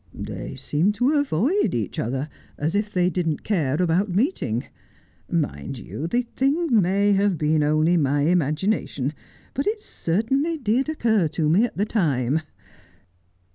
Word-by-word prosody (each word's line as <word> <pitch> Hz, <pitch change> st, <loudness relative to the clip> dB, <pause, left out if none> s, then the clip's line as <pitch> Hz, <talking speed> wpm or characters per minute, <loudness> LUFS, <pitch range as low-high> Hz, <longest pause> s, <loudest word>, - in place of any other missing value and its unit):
They -, -, -6 dB
seemed 175 Hz, +8 st, 0 dB
to 245 Hz, +6 st, +2 dB
avoid 285 Hz, -, +1 dB
each 110 Hz, -6 st, -3 dB
other, 130 Hz, +5 st, -2 dB, 0.3 s
as 155 Hz, +3 st, -1 dB
if 205 Hz, +1 st, 0 dB
they 180 Hz, -3 st, +2 dB
didn't 165 Hz, -4 st, -1 dB
cais 155 Hz, -8 st, 0 dB
about 180 Hz, +3 st, +2 dB
meeting. 180 Hz, -, 0 dB, 0.6 s
Mind 135 Hz, -, -2 dB
you, 145 Hz, +6 st, -5 dB
the 240 Hz, +8 st, +1 dB
thing 270 Hz, 0 st, +1 dB
may 200 Hz, +3 st, +2 dB
have 200 Hz, -2 st, +2 dB
been 155 Hz, +1 st, +2 dB
only 155 Hz, +4 st, +3 dB
my 145 Hz, -1 st, +2 dB
imagina 175 Hz, +5 st, +1 dB
tion, 140 Hz, +2 st, -3 dB, 0.4 s
but 275 Hz, -, -2 dB
it 425 Hz, +1 st, 0 dB
certainly 270 Hz, -, -1 dB
did 255 Hz, +2 st, 0 dB
occur 220 Hz, -, +2 dB
to 155 Hz, 0 st, -1 dB
me 185 Hz, +10 st, +4 dB
at 245 Hz, -, -7 dB
the 205 Hz, -, +1 dB
time. 150 Hz, -, +1 dB
180 Hz, 150 wpm, -23 LUFS, 150-225 Hz, 0.6 s, me